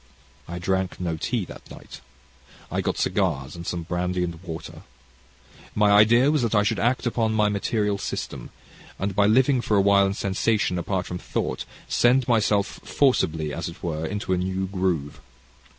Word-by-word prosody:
"I 85 - -5
drank 95 +1 -1
no 85 -3 -2
tea 110 +5 -2
that - - -12
night. - - -12 0.7
I - - 0
got - - -2
cigars 65 +3 -1
and 85 0 -8
some 85 -1 -3
brandy 90 +1 -1
and 85 -1 -5
water. 85 -3 -8 0.9
My 105 -1 +4
idea 115 +7 +6
was 155 -3 +1
that 115 -2 0
I 105 - +4
should 105 0 0
act 120 +4 +1
upon 115 -2 0
my 105 -1 +3
material 105 0 -1
system, - - -5 0.5
and 95 0 -3
by 100 0 +4
living 130 +3 +4
for 105 -3 +1
a - - +5
while 100 0 +4
in 95 - -2
sensation 100 -1 0
apart 90 +1 -2
from 90 - -5
thought, 65 - -3 0.2
send 125 +1 +3
myself 105 -3 +1
forcibly, 80 - +1
as - - -4
it - - -13
were, 80 -2 -2
into 105 +3 -2
a - - +1
new 95 +1 -1
groove. 90 -6 -2
100 Hz, 175 wpm, -24 LUFS, 90-110 Hz, 0.9 s, idea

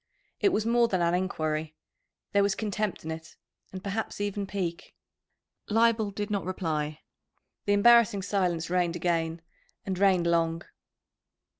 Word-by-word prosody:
It 400 - +4
was 220 - 0
more 235 +1 +4
than 185 -5 0
an 170 0 +2
enquiry. 155 -4 -1 0.6
There 200 - +4
was 200 0 +2
contempt 210 -4 -3
in 160 - -3
it, 160 +1 -8 0.4
and 185 0 -8
perhaps 205 +2 -3
even 205 -1 -2
pique. 180 -4 -4 0.7
Leibel 225 -1 +3
did 205 +1 -4
not 200 -4 0
reply. 155 -5 -3 0.6
The 205 - +3
embarrassing 210 -2 +5
silence 175 -4 -1
reigned 175 -2 +1
again, 165 -1 -1 0.4
and 190 -2 -3
reigned 190 -3 +4
long. 165 0 +1
185 Hz, 140 wpm, -28 LUFS, 170-205 Hz, 0.7 s, embarrassing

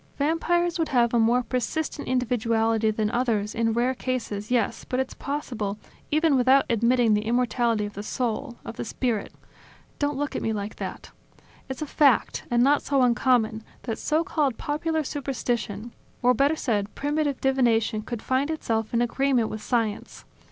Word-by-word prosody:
Vampires 340 +3 +1
would 325 - +1
have 240 -3 +2
a 235 - +4
more 240 +3 +3
persistent 265 +5 -3
individuality 225 -3 +1
than 215 0 0
others, 230 -4 0
in 230 0 +1
rare 240 +3 +1
cases, 235 -5 -3
yes, 240 -4 0
but 255 - -2
it's 265 - -2
possible 240 -8 -4 0.3
even 310 -1 +3
without 265 +2 +5
admitting 235 0 +3
the 210 - +2
immortality 235 -1 +1
of 205 - -7
the 200 - -6
soul, 235 +1 -3
of - - -7
the - - -3
spirit... 230 -2 -2 0.7
Don't 290 -1 0
look 290 0 -2
at - - -2
me 225 - -1
like 205 0 -5
that... - - -6 0.6
It's 265 +3 -4
a - - -3
fact, 280 -3 +2
and 240 0 +3
not 285 +2 +4
so 275 -2 +2
uncommon, 235 -3 +2 0.2
that 225 -3 -4
so 315 +2 +1
called 285 -8 0
popular 315 +2 -1
superstition 240 -6 -3 0.3
or, 250 +1 +5
better 280 +5 +2
said 210 -8 -1
primitive 290 -1 -1
divination 235 -5 +2
could 225 0 -6
find 265 +3 0
itself 225 -8 -2
in 235 - +3
agreement 250 -2 +1
with 215 - -6
science. 225 -3 -2
245 Hz, 165 wpm, -25 LUFS, 225-275 Hz, 0.7 s, without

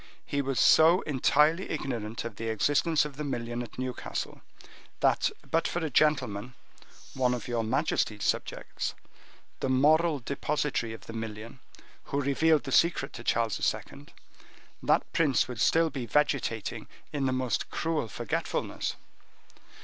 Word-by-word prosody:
He 140 - -1
was 135 -1 -1
so 165 +4 +6
entirely 150 +5 +2
ignorant 115 -7 -4
of 115 -3 -6
the 115 0 -3
existence 145 +8 +2
of 145 -2 -8
the 150 - -3
million 120 -3 -3
at 120 -3 -9
Newcastle, 130 -1 -4 0.6
that - - +3 0.2
but 165 0 +2
for - - -3
a 155 - -3
gentleman—one 125 -1 -1
of 120 - -7
your 120 -2 -1
majesty's 110 -3 0
subjects—the 135 - -4
moral 155 +5 +4
depositary 140 -2 -2
of 115 - -11
the 115 - -8
million, 115 +2 -6 0.5
who 140 - -2
revealed 150 +3 +3
the 135 - -6
secret 165 -4 +2
to 115 - -8
King - - +3
Charles 115 -4 +1 0.2
II., 70 +1 -13 0.7
that - - +1
prince 145 -7 +3
would 120 -3 -5
still 165 -1 +3
be 130 -5 -5
vegetating 135 -7 0 0.3
in 140 -2 0
the - - +1
most 130 -1 -1
cruel 160 -7 -1
forgetfulness." 105 - -3
130 Hz, 140 wpm, -29 LUFS, 115-150 Hz, 0.7 s, so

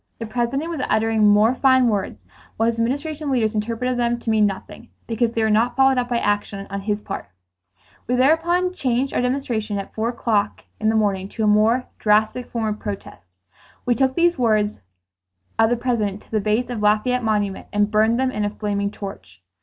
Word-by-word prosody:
The 230 - -5
President 245 +7 -2
was 330 -5 -4
uttering 220 -1 +3
more 210 +3 +5
fine 260 -1 +4
words, 190 - -2 0.3
while 225 - +2
his 230 0 -1
Administration 290 +5 -2
leaders 235 -5 +1
interpreted 230 +4 -2
them 240 0 +1
to 225 - -1
mean 215 -1 +4
nothing, 200 +4 -8 0.2
because 230 0 -1
they 225 - 0
were 220 - +2
not 225 +3 +2
followed 265 -1 +4
up 245 0 -2
by 240 - +1
action 205 -2 -1
on 200 0 -3
his 205 +1 -2
part. 195 - -6 0.8
We 250 - +1
thereupon 335 +7 +2
changed 260 -4 -1
our - - +1
demonstration 245 -5 -2
at 195 - -6
four 225 +1 -1
o'clock 215 -4 -1 0.2
to 215 -2 0
a - - +3
more 220 +4 +3
drastic 215 +3 +1
form 230 -2 -2
of 210 - -12
protest. 195 - -7 0.6
We 245 - +3
took 260 +2 +1
these 345 -3 +2
words 215 -3 +1 0.8
of 225 0 +5
the 240 - +1
President 215 -5 -1
to - - -27
the 215 -2 +1
base 220 +4 0
of 230 -3 -4
Lafayette 215 +4 +2
Monument 205 -3 -1
and 205 0 +1
burned 220 +2 +3
them 260 0 +1
in 210 -4 -2
a 205 - 0
flaming 205 -1 -2
torch. 95 - -10
225 Hz, 190 wpm, -22 LUFS, 210-250 Hz, 0.8 s, more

